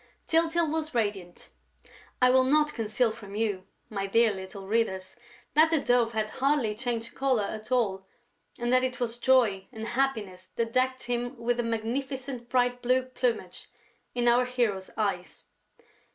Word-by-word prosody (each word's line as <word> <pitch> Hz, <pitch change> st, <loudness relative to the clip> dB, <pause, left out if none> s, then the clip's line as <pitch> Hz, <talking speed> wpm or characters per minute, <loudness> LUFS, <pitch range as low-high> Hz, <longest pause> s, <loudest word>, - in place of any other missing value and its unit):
Tyltyl 330 Hz, +1 st, +2 dB
was 315 Hz, -3 st, -3 dB
radiant. 205 Hz, -6 st, -2 dB, 0.7 s
I 250 Hz, -, +7 dB
will 260 Hz, 0 st, +5 dB
not 300 Hz, +3 st, +3 dB
conceal 225 Hz, +1 st, 0 dB
from 205 Hz, -2 st, -10 dB
you, 205 Hz, -4 st, -1 dB, 0.2 s
my 195 Hz, -2 st, -3 dB
dear 230 Hz, +2 st, +4 dB
little 190 Hz, 0 st, -8 dB
readers, 190 Hz, -4 st, -1 dB, 0.4 s
that 315 Hz, +2 st, +6 dB
the 320 Hz, -1 st, +2 dB
Dove 245 Hz, -3 st, +2 dB
had 215 Hz, -1 st, -1 dB
hardly 270 Hz, -5 st, +1 dB
changed 230 Hz, 0 st, -3 dB
colour 260 Hz, -5 st, +1 dB
at 215 Hz, +3 st, -6 dB
all 195 Hz, -6 st, +1 dB, 0.5 s
and 240 Hz, 0 st, 0 dB
that 255 Hz, 0 st, +4 dB
it 255 Hz, +1 st, -2 dB
was 240 Hz, -1 st, -2 dB
joy 235 Hz, -7 st, +3 dB
and 220 Hz, -2 st, -6 dB
happiness 215 Hz, -9 st, -1 dB
that 230 Hz, 0 st, -2 dB
decked 255 Hz, 0 st, +1 dB
him 245 Hz, +1 st, -2 dB
with 240 Hz, +1 st, -1 dB
a -, -, +1 dB
magnificent 245 Hz, +2 st, -3 dB
bright 245 Hz, -1 st, +1 dB
blue 255 Hz, +1 st, +2 dB
plumage 245 Hz, -7 st, -2 dB, 0.5 s
in 240 Hz, 0 st, +1 dB
our 245 Hz, +1 st, +5 dB
hero's 235 Hz, -7 st, -1 dB
eyes. 195 Hz, -5 st, -2 dB
235 Hz, 155 wpm, -28 LUFS, 215-255 Hz, 0.7 s, I